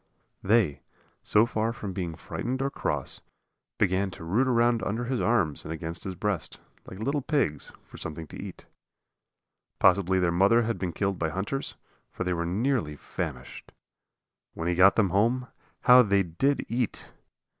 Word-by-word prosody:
They, 100 Hz, -, +2 dB, 0.4 s
so 105 Hz, +2 st, +4 dB
far 115 Hz, -1 st, -1 dB
from 105 Hz, -4 st, -6 dB
being 85 Hz, -3 st, -4 dB
frightened 100 Hz, +11 st, -4 dB
or 140 Hz, -, -1 dB
cross, -, -, -3 dB, 0.6 s
began 95 Hz, 0 st, +1 dB
to 90 Hz, -, -10 dB
root 105 Hz, +11 st, +1 dB
around 120 Hz, -2 st, +3 dB
under 115 Hz, +4 st, -2 dB
his 125 Hz, 0 st, -1 dB
arms 100 Hz, -11 st, +1 dB
and 80 Hz, -, -7 dB
against 80 Hz, +1 st, -5 dB
his 95 Hz, -1 st, -4 dB
breast, 105 Hz, -1 st, -2 dB, 0.3 s
like 95 Hz, -, -9 dB
little 140 Hz, +7 st, -1 dB
pigs, 125 Hz, -, -1 dB
for -, -, -14 dB
something 80 Hz, +1 st, -6 dB
to -, -, -12 dB
eat. -, -, -9 dB, 1.1 s
Possibly 95 Hz, -1 st, +4 dB
their 90 Hz, -2 st, +2 dB
mother 100 Hz, +7 st, +4 dB
had 115 Hz, 0 st, -2 dB
been 90 Hz, -2 st, -2 dB
killed 95 Hz, +2 st, -2 dB
by 80 Hz, -, 0 dB
hunters, 95 Hz, -, -3 dB, 0.3 s
for -, -, -4 dB
they 90 Hz, 0 st, 0 dB
were 85 Hz, 0 st, -2 dB
nearly 105 Hz, -, 0 dB
famished. -, -, -6 dB, 0.8 s
When 85 Hz, -, -3 dB
he 90 Hz, -, +2 dB
got 90 Hz, +3 st, +6 dB
them 100 Hz, -5 st, +2 dB
home, 120 Hz, +5 st, +1 dB, 0.3 s
how 125 Hz, +1 st, +8 dB
they 100 Hz, -4 st, +3 dB
did 130 Hz, -, 0 dB
eat! 120 Hz, -1 st, -3 dB
100 Hz, 165 wpm, -27 LUFS, 85-120 Hz, 1.1 s, how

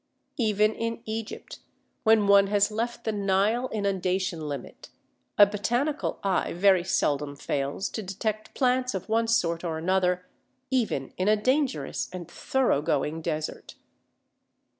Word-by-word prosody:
Even 215 Hz, -1 st, +3 dB
in 230 Hz, +1 st, -4 dB
Egypt, 220 Hz, 0 st, -6 dB, 0.4 s
when 220 Hz, -2 st, +4 dB
one 200 Hz, 0 st, +6 dB
has 205 Hz, +1 st, +2 dB
left 235 Hz, +3 st, -3 dB
the 220 Hz, -, 0 dB
Nile 205 Hz, +5 st, +1 dB
inundation 185 Hz, -5 st, -1 dB
limit, 140 Hz, -3 st, -7 dB, 0.5 s
a 205 Hz, -, +10 dB
botanical 240 Hz, +9 st, -1 dB
eye 195 Hz, -2 st, 0 dB
very 185 Hz, 0 st, +4 dB
seldom 145 Hz, -5 st, 0 dB
fails 140 Hz, +5 st, -2 dB
to 220 Hz, -, -5 dB
detect 215 Hz, +2 st, -4 dB
plants 255 Hz, -2 st, +1 dB
of 190 Hz, -, -5 dB
one 225 Hz, +1 st, +1 dB
sort 170 Hz, -7 st, +1 dB
or 165 Hz, -2 st, -2 dB
another 180 Hz, +1 st, +1 dB, 0.5 s
even 220 Hz, -, -1 dB
in 185 Hz, -, 0 dB
a 215 Hz, -, +5 dB
dangerous 260 Hz, +5 st, 0 dB
and 180 Hz, -3 st, -7 dB
thorough 260 Hz, -, +1 dB
going 150 Hz, +1 st, -1 dB
desert. 155 Hz, -2 st, -4 dB
200 Hz, 135 wpm, -27 LUFS, 175-225 Hz, 0.5 s, a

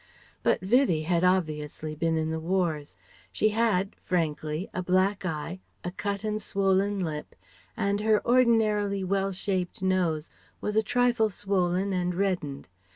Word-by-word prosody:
But -, -, +2 dB
Vivie 190 Hz, -, +3 dB
had 170 Hz, +1 st, +1 dB
obviously 155 Hz, -4 st, 0 dB
been 165 Hz, +1 st, 0 dB
in 160 Hz, 0 st, -1 dB
the 160 Hz, -, -2 dB
wars. 165 Hz, -4 st, -1 dB, 0.3 s
She 215 Hz, -, +2 dB
had 210 Hz, -3 st, +1 dB
frankly 160 Hz, -1 st, -1 dB
a 180 Hz, -, -2 dB
black 185 Hz, +2 st, +1 dB
eye, 165 Hz, +3 st, -4 dB, 0.2 s
a 175 Hz, -, -3 dB
cut 200 Hz, +2 st, -3 dB
and 215 Hz, 0 st, -1 dB
swollen 195 Hz, 0 st, +1 dB
lip, 155 Hz, -5 st, -4 dB, 0.4 s
and 200 Hz, -2 st, +1 dB
her 215 Hz, 0 st, +2 dB
ordinarily 215 Hz, -5 st, +3 dB
well 195 Hz, +1 st, 0 dB
shaped 185 Hz, -1 st, -2 dB
nose 175 Hz, -5 st, 0 dB, 0.3 s
was 210 Hz, -, -3 dB
a 220 Hz, -, +5 dB
trifle 240 Hz, -1 st, +2 dB
swollen 190 Hz, -1 st, 0 dB
and 180 Hz, -1 st, -1 dB
reddened. 175 Hz, -8 st, -2 dB
185 Hz, 145 wpm, -27 LUFS, 170-205 Hz, 0.4 s, a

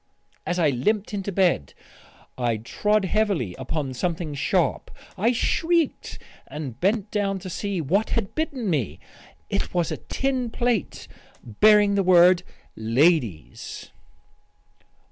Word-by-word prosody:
As 180 Hz, -, -1 dB
I 160 Hz, -5 st, +3 dB
limped 205 Hz, -, -1 dB
into 200 Hz, 0 st, -3 dB
bed, 175 Hz, -, +1 dB, 0.6 s
I 120 Hz, -3 st, 0 dB
trod 210 Hz, -, 0 dB
heavily 190 Hz, -, 0 dB
upon 145 Hz, -5 st, -3 dB
something 165 Hz, +3 st, -3 dB
sharp. 165 Hz, +5 st, 0 dB, 0.3 s
I 215 Hz, +5 st, +2 dB
shrieked 330 Hz, +6 st, 0 dB, 0.3 s
and 135 Hz, -6 st, -7 dB
bent 205 Hz, +2 st, 0 dB
down 200 Hz, -2 st, 0 dB
to 185 Hz, -1 st, -8 dB
see 200 Hz, -1 st, -2 dB
what 190 Hz, +9 st, 0 dB
had 220 Hz, -5 st, -2 dB
bitten 290 Hz, -8 st, -2 dB
me. 120 Hz, -, -1 dB, 0.5 s
It -, -, -3 dB
was 175 Hz, -3 st, +1 dB
a -, -, -3 dB
tin 260 Hz, -3 st, -2 dB
plate 240 Hz, -2 st, -2 dB, 0.4 s
bearing 205 Hz, -, +4 dB
the 200 Hz, -, +2 dB
word 180 Hz, -1 st, +6 dB, 0.3 s
"LADIES." 115 Hz, -, 0 dB
185 Hz, 125 wpm, -24 LUFS, 150-210 Hz, 0.6 s, word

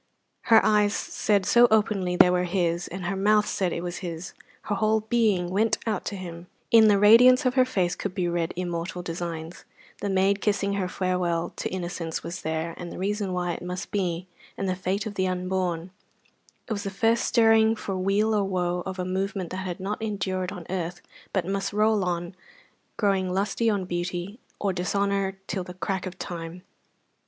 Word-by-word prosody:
Her 225 Hz, -, +6 dB
eyes 210 Hz, -1 st, +3 dB
said 200 Hz, -3 st, 0 dB
so 240 Hz, +4 st, +6 dB
openly 205 Hz, -4 st, +2 dB
they 180 Hz, 0 st, +7 dB
were 180 Hz, 0 st, +1 dB
his, 175 Hz, -1 st, 0 dB
and 185 Hz, 0 st, -6 dB
her 185 Hz, +3 st, -1 dB
mouth 210 Hz, +2 st, +3 dB
said 185 Hz, -3 st, 0 dB
it 170 Hz, -, -3 dB
was 175 Hz, 0 st, -4 dB
his, 170 Hz, -2 st, -6 dB, 0.3 s
her 210 Hz, -, -2 dB
whole 215 Hz, +1 st, +2 dB
being 215 Hz, -6 st, +1 dB
went 220 Hz, +4 st, +2 dB
out 215 Hz, -4 st, -2 dB
to 205 Hz, -, -3 dB
him; 175 Hz, -2 st, -8 dB, 0.2 s
in 225 Hz, -1 st, +8 dB
the 205 Hz, -1 st, +5 dB
radiance 250 Hz, +6 st, +7 dB
of 250 Hz, -, +3 dB
her 255 Hz, -1 st, +4 dB
face 185 Hz, -9 st, 0 dB
could 200 Hz, -2 st, -5 dB
be 180 Hz, -3 st, 0 dB
read 170 Hz, -1 st, -1 dB
immortal 175 Hz, 0 st, -3 dB
designs: 165 Hz, -1 st, -5 dB, 0.4 s
the 200 Hz, -, -2 dB
maid 195 Hz, +1 st, +2 dB
kissing 200 Hz, -1 st, +1 dB
her 195 Hz, -2 st, -1 dB
farewell 180 Hz, -2 st, -1 dB
to -, -, -2 dB
innocence 175 Hz, -3 st, -4 dB
was 175 Hz, +2 st, -6 dB
there, 160 Hz, +1 st, -2 dB
and 175 Hz, -1 st, -7 dB
the -, -, -8 dB
reason 200 Hz, +1 st, -1 dB
why 180 Hz, -1 st, -1 dB
it -, -, -7 dB
must 180 Hz, +1 st, -5 dB
be, 180 Hz, -3 st, -1 dB, 0.3 s
and 195 Hz, -, -2 dB
the 185 Hz, -, 0 dB
fate 190 Hz, +3 st, -2 dB
of 215 Hz, -, -4 dB
the 185 Hz, -1 st, 0 dB
unborn; 180 Hz, -1 st, -2 dB, 0.8 s
it 225 Hz, -, -1 dB
was 200 Hz, -, -3 dB
the 200 Hz, -, -3 dB
first 225 Hz, +4 st, +1 dB
stirring 225 Hz, -1 st, +4 dB
for 200 Hz, -3 st, -4 dB
weal 200 Hz, +4 st, +1 dB
or 210 Hz, -1 st, +2 dB
woe 180 Hz, -2 st, -1 dB
of 190 Hz, 0 st, -5 dB
a 180 Hz, -, -2 dB
movement 190 Hz, -1 st, -2 dB
that 185 Hz, -, -4 dB
has 190 Hz, -1 st, -4 dB
no 200 Hz, +3 st, -3 dB
end 205 Hz, -4 st, -2 dB
on 185 Hz, -1 st, -3 dB
earth, 175 Hz, -1 st, -3 dB, 0.3 s
but 190 Hz, -4 st, 0 dB
must 195 Hz, +1 st, -2 dB
roll 215 Hz, -1 st, +3 dB
on, 175 Hz, 0 st, -2 dB, 0.6 s
growing 195 Hz, -3 st, +1 dB
lusty 205 Hz, +4 st, 0 dB
on 200 Hz, -3 st, 0 dB
beauty 175 Hz, +4 st, -4 dB, 0.2 s
or 200 Hz, -2 st, 0 dB
dishonour 195 Hz, +1 st, 0 dB
till 190 Hz, -2 st, -3 dB
the 180 Hz, 0 st, -10 dB
crack 190 Hz, 0 st, -2 dB
of 185 Hz, 0 st, -8 dB
time. 170 Hz, 0 st, -6 dB
190 Hz, 195 wpm, -26 LUFS, 180-205 Hz, 0.8 s, in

